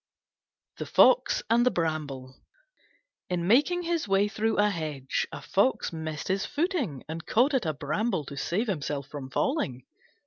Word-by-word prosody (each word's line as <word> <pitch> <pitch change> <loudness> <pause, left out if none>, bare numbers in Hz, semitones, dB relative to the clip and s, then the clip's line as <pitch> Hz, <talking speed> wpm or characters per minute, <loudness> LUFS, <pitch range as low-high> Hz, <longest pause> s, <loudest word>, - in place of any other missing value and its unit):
THE - - -5
FOX - - +4
AND 240 +1 +4
THE 250 - +4
BRAMBLE 150 - -3 1.0
In 175 -2 -1
making 300 - +3
his 335 -6 -1
way 195 +1 +3
through 220 +1 -1
a 210 0 +3
hedge 150 -7 -3
a - - -8
Fox 200 -1 +1
missed 160 -2 -5
his 190 +1 0
footing 295 - -2
and 160 +1 -6
caught 255 +6 +3
at 250 -10 +1
a 155 - 0
Bramble 160 +4 -1
to 140 - -8
save 180 - -1
himself 150 - -3
from 140 -3 -7
falling. 135 - -1
185 Hz, 160 wpm, -28 LUFS, 150-240 Hz, 1.0 s, FOX